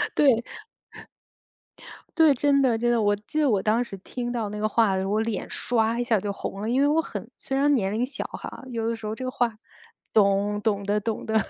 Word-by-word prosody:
对。 250 -6 +4 1.7
对， 320 -3 +6
真 280 +1 +3
的 240 -4 +3
真 240 +1 +1
的， 235 -2 +2
我 205 0 +3
记 215 +9 -5
得 290 -3 +3
我 200 -4 +2
当 225 +3 +2
时 195 -5 -9
听 240 +4 -5
到 225 -4 -2
那 210 0 -6
个 215 0 0
话 210 -3 +3
的 190 - 0
时 - - -2
候， 195 - -2
我 215 - +2
脸 225 -3 -3
刷 230 0 0
一 - - +1
下 225 -4 +2
就 200 +1 -3
红 195 0 -6
了， 220 - -2
因 260 +3 +2
为 285 - +4
我 315 +2 +3
很 - - -7
虽 270 0 -2
然 290 +1 +3
年 195 -4 0
龄 235 +3 0
小 280 - -5
哈， - - -8
有 230 -2 -2
的 230 - -1
时 225 -1 -10
候 215 +1 -3
这 255 - -6
个 255 - -2
话， 235 -4 -1 0.6
懂 205 0 +3
懂 205 -2 0
的 205 +1 +1
懂 220 +1 -3
的。 220 - -2
225 Hz, 260 characters per minute, -25 LUFS, 210-245 Hz, 1.7 s, 对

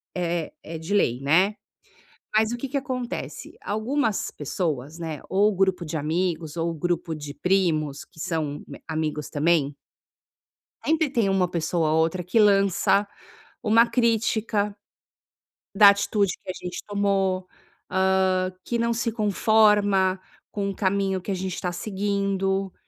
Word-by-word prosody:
é 170 -2 -2
é 165 0 -6
de 160 +6 -4
lei, 125 -11 +2
né. 180 +10 +3 0.8
Mas 220 +1 +3
o - - -1
que 265 +3 -5
que 280 - -3
acontece? 255 -3 -4
Algumas 220 +2 -1
pessoas, 150 -1 -3
né, 160 -3 -4
ou 200 +2 +3
o - - -5
grupo 190 -2 +1
de 155 0 -4
amigos, 160 +1 -2
ou 165 +1 0
o 165 - -4
grupo 170 0 -2
de 145 -1 -7
primos 160 -7 0
que 160 - -16
são 155 -3 -2 0.3
amigos 155 -2 -2
também 150 -2 +1 1.1
sempre 315 -2 +2
tem 230 -6 +1
uma 190 -2 +2
pessoa 165 -1 0
ou 160 - +3
outra 165 +3 0
que 180 +6 +1
lança 200 0 +4 0.6
uma 230 +2 +5
crítica 220 -3 +1 1.0
da 205 0 +9
atitude 200 -1 +1
que - - -11
a - - -8
gente 180 -1 -6
tomou, 195 -2 0 0.4
hã, 190 -1 +2
que 235 - -1
não 235 0 +1
se 230 0 -1
conforma 205 -3 +3 0.3
com 200 -1 -2
o 195 - -5
caminho 195 -1 0
que 200 - -5
a - - 0
gente 185 -1 -4
tá 180 - -1
seguindo. 195 -1 -1
190 Hz, 145 wpm, -25 LUFS, 165-205 Hz, 1.1 s, da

